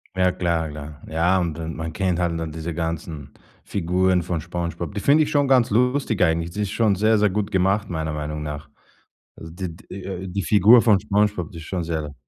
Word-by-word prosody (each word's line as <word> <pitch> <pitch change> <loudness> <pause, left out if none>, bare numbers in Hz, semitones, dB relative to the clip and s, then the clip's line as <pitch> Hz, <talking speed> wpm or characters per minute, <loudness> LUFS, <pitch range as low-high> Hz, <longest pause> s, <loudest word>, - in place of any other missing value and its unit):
Ja 90 0 +3
klar, 85 -3 -1
klar. 75 0 -9
Ja, 85 +4 +2
und 85 -3 -2
dann 80 -1 -5
man 80 0 -4
kennt 90 0 -1
halt, 85 -1 0
ne, 80 0 -3
diese 80 +1 -5
ganzen 80 -3 -4 0.3
Figuren 90 0 +1
von 85 -2 -3
Spongebob. 85 +1 -4
Die 100 - -3
finde 150 +6 +5
ich 150 - -3
schon 145 -2 +2
ganz 125 -5 +4
lustig 125 -1 +1
eigentlich. 85 0 +2
Die 105 +4 -4
ist 100 - -1
schon 110 -3 +2
sehr, 110 +3 +3
sehr 105 -1 +3
gut 105 +1 -1
gemacht 95 +2 +1
meiner 80 -3 -3
Meinung 75 0 -4
nach. 75 0 -6 0.7
Also 80 - -10
d 90 +1 -5
d 80 - -14
äh, 95 -1 -6
die 100 +2 -2
Figur 110 +6 +6
von 105 -4 +4
Spongebob, 105 -4 0
die 85 - -10
ist 80 - -9
schon 90 -2 -3
sehr 80 -3 -4
90 Hz, 215 wpm, -23 LUFS, 80-100 Hz, 0.7 s, Figur